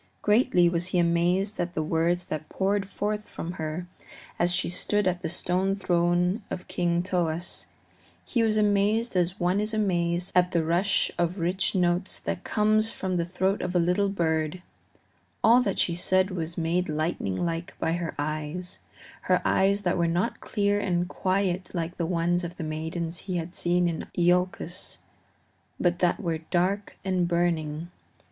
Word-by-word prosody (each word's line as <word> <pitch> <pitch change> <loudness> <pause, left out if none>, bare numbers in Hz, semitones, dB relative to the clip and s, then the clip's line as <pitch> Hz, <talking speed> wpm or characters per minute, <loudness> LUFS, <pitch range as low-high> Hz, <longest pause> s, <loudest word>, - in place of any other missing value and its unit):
Greatly 210 -4 +4
was 170 +1 0
he 185 - -1
amazed 175 +4 +2
at 175 0 -2
the 155 - 0
words 170 +3 +1
that 155 0 -5
poured 195 +1 0
forth 210 +1 -3
from 170 - -5
her 160 +1 -4 0.5
as 175 0 +3
she 180 0 +2
stood 205 +3 0
at 180 -1 0
the 165 - -2
stone 185 +3 0
throne 175 +1 +1
of 180 - -5
King 175 -1 0
Thoas 175 -1 -2 0.6
he 240 - 0
was 220 -1 +2
amazed 210 +2 +2
as 180 +2 +1
one 180 +3 +2
is 215 +1 -2
amazed 175 -3 0
at 180 0 +3
the 170 -2 +2
rush 185 +4 +2
of 175 +2 0
rich 185 +3 0
notes 180 +1 +1
that 185 - -4
comes 215 +1 +2
from 190 -4 -3
the 170 -1 0
throat 190 +3 0
of 180 0 -3
a - - +5
little 180 +4 +2
bird; 160 -2 -1 0.8
all 235 +3 +7
that 200 -5 -1
she 170 - +2
said 185 +2 +1
was 170 -2 -4
made 170 +2 0
lightning 155 - -1
like 165 - -3
by - - 0
her 170 -2 -3
eyes 155 +4 -4 0.4
her - - +2
eyes 200 +1 +3
that 180 -1 +1
were 170 - +3
not 175 +7 -1
clear 205 -1 +1
and 175 -2 0
quiet 185 -1 0
like 170 +1 -3
the 170 - -1
eyes 175 +1 +1
of 175 0 -6
the - - -4
maidens 160 +2 -3
he 185 -2 -3
had 170 +1 -4
seen 175 0 +1
in 165 -2 -3
Iolcus, 180 0 0 0.8
but 175 -1 +1
that 180 +3 +2
were 165 -6 -2
dark 185 +5 -1
and 185 -2 +1
burning. 170 -2 0
175 Hz, 170 wpm, -27 LUFS, 170-190 Hz, 0.8 s, all